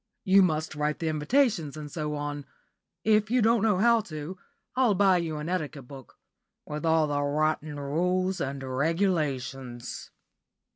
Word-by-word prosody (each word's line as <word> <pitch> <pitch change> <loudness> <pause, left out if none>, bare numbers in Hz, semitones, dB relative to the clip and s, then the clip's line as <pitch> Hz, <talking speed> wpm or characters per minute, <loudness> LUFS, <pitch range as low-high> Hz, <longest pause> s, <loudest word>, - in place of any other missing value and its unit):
You 195 -1 +6
must 160 -4 +1
write 150 0 -1
the 165 - -2
invitations 160 - +1
and 150 -1 -7
so 150 -1 -3
on. 145 -1 -5 0.6
If 215 0 +3
you 250 +2 +3
don't 230 -1 +3
know 215 -3 +3
how 235 +3 +4
to, 155 -2 -7 0.4
I'll 250 -5 +3
buy 190 -1 +4
you 165 -3 -2
an 150 +1 -5
etiquette 155 -7 -3
book, 135 -2 -12 0.5
with 150 +2 -4
all 160 -1 +4
the 145 -1 -1
rotten 150 +1 -1
rules 180 +6 0
and 135 0 -3
regulations." 135 -4 -2
155 Hz, 150 wpm, -27 LUFS, 145-190 Hz, 0.6 s, You